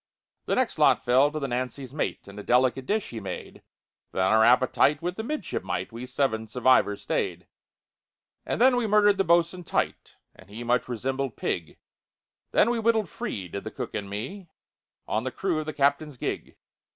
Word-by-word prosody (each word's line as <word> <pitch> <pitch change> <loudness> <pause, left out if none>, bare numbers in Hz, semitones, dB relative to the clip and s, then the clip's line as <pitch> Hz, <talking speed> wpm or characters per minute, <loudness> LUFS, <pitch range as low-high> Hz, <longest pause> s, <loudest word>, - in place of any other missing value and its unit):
"The - - +1
next - - 0
lot - - +4
fell 130 +4 +4
to 155 - -3
the 140 - -2
Nancy's 130 +1 -4
mate, 150 - -3
And 100 +1 -10
a - - -7
delicate 130 +2 +2
dish 215 0 0
he 115 - -5
made; 95 - -7 0.5
Then 95 - 0
our 110 +4 +4
appetite 130 +4 +4
with 175 +3 -3
the 220 - -4
midshipmite 295 - -3
We 120 +2 -7
seven 125 -4 -1
survivors 120 -3 +2
stayed. - - -2 1.0
"And - - -3
then 250 +1 +5
we 240 -2 0
murdered 205 -1 +4
the - - +4
bos'un 170 +1 +2
tight, - - -2 0.2
And 95 - -18
he 110 +4 -7
much 120 +1 +1
resembled 130 +1 -3
pig; 85 -3 -3 0.7
Then 235 - +3
we 240 - 0
wittled 220 -4 +2
free, 95 -9 -5
did 100 +3 -6
the - - -5
cook - - -6
and 100 -1 -4
me, 130 - -6 0.6
On 110 - -1
the 130 - -2
crew 175 +3 -1
of 155 - -5
the - - -1
captain's 140 0 +1
gig. - - -4
130 Hz, 185 wpm, -26 LUFS, 115-175 Hz, 1.0 s, then